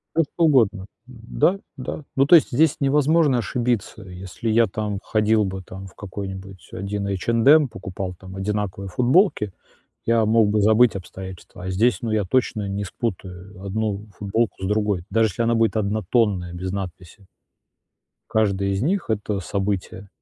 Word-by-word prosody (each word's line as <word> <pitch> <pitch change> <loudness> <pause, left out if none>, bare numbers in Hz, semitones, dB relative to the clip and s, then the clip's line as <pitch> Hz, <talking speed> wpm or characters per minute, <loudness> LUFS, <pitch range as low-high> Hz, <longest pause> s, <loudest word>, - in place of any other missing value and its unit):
Да 165 - +4
что 165 +3 -3
угодно. 115 -11 +3 0.2
Да, 130 - 0 0.2
да, 135 +3 -5
ну, 135 - +4
то 160 - +7
есть 165 - +4
здесь 150 +4 +3
невозможно 145 0 +3
ошибиться. 120 -3 -2
Если 95 +4 -6
я 115 +1 +4
там 105 0 -3
ходил 110 0 +2
бы 95 0 -4
там 95 +2 -9
в 95 - -18
какой-нибудь 95 -2 -8
1 100 +1 -3
H&M, 115 - +4
покупал 95 -2 -6
там 95 +1 -11
одинаковые 100 -1 -3
футболки, 125 - +2 0.5
я 115 -1 +3
мог 110 0 +4
бы 105 +1 +1
забыть 110 +2 +4
обстоятельства, 95 -1 -9
а 95 - -3
здесь, 115 +7 +2
ну, 115 - -2
я 110 -2 +1
точно 105 0 0
не 100 +1 -3
спутаю 95 -2 -6
1 105 +1 -2
футболку 105 0 -1
с - - -1
другой, 105 -3 0
даже 110 +2 +3
если 105 +4 -3
она 115 0 +2
будет 115 -1 +2
однотонная 105 -3 0
без 90 +1 -4
надписи. 95 0 -7 1.1
Каждая 100 -3 +1
из 95 0 -1
них- 175 +5 0
это 105 -2 -1
событие, 95 0 -3
105 Hz, 155 wpm, -23 LUFS, 95-115 Hz, 1.1 s, то